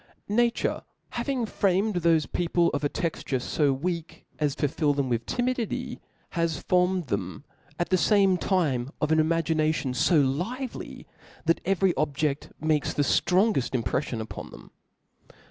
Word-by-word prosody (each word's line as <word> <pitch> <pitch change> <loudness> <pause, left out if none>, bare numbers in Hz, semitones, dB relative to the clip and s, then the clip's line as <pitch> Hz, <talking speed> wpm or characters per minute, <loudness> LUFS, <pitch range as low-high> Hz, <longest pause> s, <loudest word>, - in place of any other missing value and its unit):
Nature 235 +3 +1 0.3
having 245 0 -1
framed 200 0 +1
thofe 165 -3 +2
people 170 0 +2
of 145 - -2
a 145 - +2
texture 155 -6 -2
fo 145 +3 +1
weak 165 +4 -4
as 145 -2 0
to 145 - +1
fill 145 +1 +1
them 140 -2 0
with 115 -1 -1
timidity, 245 -2 -2 0.3
has 165 -2 0
formed 180 -1 +1
them 100 0 -3 0.3
at 175 - -1
the 185 - +3
fame 195 -2 +4
time 150 -10 0
of 150 - 0
an 160 - +4
imagination 155 -3 +1
fo 155 +6 +3
lively, 185 - -3 0.4
that 165 +1 +2
every 190 -1 +2
objeft 150 -1 -1
makes 155 -2 0
the 145 - +2
ftrongeft 175 - +2
impreflion 115 +2 -2
upon 110 - -7
them. - - -14
165 Hz, 145 wpm, -27 LUFS, 145-190 Hz, 0.4 s, fame